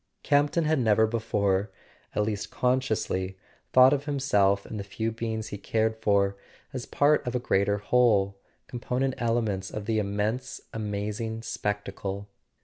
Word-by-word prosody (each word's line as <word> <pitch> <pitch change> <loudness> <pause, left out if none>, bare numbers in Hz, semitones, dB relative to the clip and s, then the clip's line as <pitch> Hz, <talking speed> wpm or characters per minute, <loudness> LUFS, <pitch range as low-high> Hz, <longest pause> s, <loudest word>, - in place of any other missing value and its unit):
Campton 145 +3 +3
had 155 -1 +2
never 110 -2 +4
before, 105 -3 0 0.5
at 105 - +2
least 105 -1 -3
consciously, 110 -7 0 0.3
thought 130 +2 +7
of 145 0 -1
himself 105 -9 +2
and 110 - -6
the - - -3
few 110 +3 -3
beings 110 -1 -4
he 100 - -6
cared 110 +2 0
for 100 -3 +2 0.4
as 125 -2 -5
part 145 -2 +3
of 120 - -2
a - - +2
greater 100 -3 +1
whole, 105 -3 +3 0.3
component 125 +2 -2
elements 110 -5 0
of 105 -1 -6
the 110 0 +1
immense 105 +4 -2
amazing 105 +1 -3
spectacle. 100 -2 -3
110 Hz, 140 wpm, -27 LUFS, 100-125 Hz, 0.5 s, thought